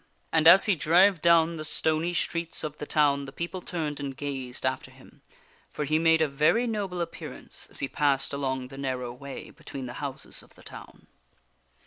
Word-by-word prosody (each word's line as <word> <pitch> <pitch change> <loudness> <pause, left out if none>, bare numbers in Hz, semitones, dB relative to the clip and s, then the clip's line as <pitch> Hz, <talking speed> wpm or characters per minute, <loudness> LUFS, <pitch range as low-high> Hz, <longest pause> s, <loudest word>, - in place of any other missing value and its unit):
And 160 -1 +4
as 185 +3 +9
he 205 - +4
drave 175 +3 +4
down 170 -1 +4
the 155 - -5
stony 160 +2 0
streets 170 -1 -1
of 150 -1 -5
the 150 - -6
town, 140 -2 +2
the 135 - -9
people 170 +5 -5
turned 155 -5 -4
and 135 -2 -5
gazed 135 -3 -5
after 130 0 -2
him, 130 0 -19 0.5
for 150 - -4
he 155 +2 +2
made 160 0 +4
a - - +2
very 155 - +2
noble 200 -6 -2
appearance 170 - -7
as - - -5
he 135 - 0
passed 140 -1 +1
along 130 -2 -2
the 135 0 -10
narrow 130 -3 -3
way 140 +2 -9
between 135 -2 -8
the 120 - -7
houses 140 -2 -6
of - - -20
the - - -17
town. - - -12
150 Hz, 190 wpm, -27 LUFS, 135-170 Hz, 0.5 s, as